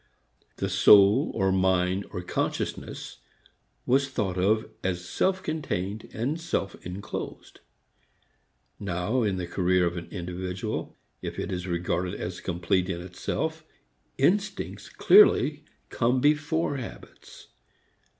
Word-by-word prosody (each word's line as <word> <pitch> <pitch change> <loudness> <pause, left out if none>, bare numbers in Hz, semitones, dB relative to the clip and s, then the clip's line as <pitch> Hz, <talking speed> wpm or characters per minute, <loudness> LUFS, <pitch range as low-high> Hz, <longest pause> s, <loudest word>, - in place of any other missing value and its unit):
The - - -2
soul 100 0 +6
or 95 0 +2
mind 95 0 +1
or 90 - -5
consciousness - - -3 0.7
was 135 +2 +2
thought 100 -8 -2
of 110 +4 +2 0.2
as 90 -1 -2
self 190 - 0
contained 110 - -3
and 140 +9 -2
self 100 -11 -2
enclosed. 90 +3 -7 1.2
Now 100 +5 -1
in 100 -4 0
the 90 - -3
career 90 0 +2
of 85 +1 -2
an 85 - -6
individual 90 0 -4 0.2
if - - -5
it - - -3
is 90 0 -3
regarded 90 0 -1
as 90 0 -5
complete 90 +1 0
in 85 -2 -2
itself 90 0 -3 0.5
instincts 195 +7 0
clearly 150 - +5 0.3
come 125 +2 +2
before 150 +1 +1
habits. 65 - -10
95 Hz, 115 wpm, -27 LUFS, 90-130 Hz, 1.2 s, soul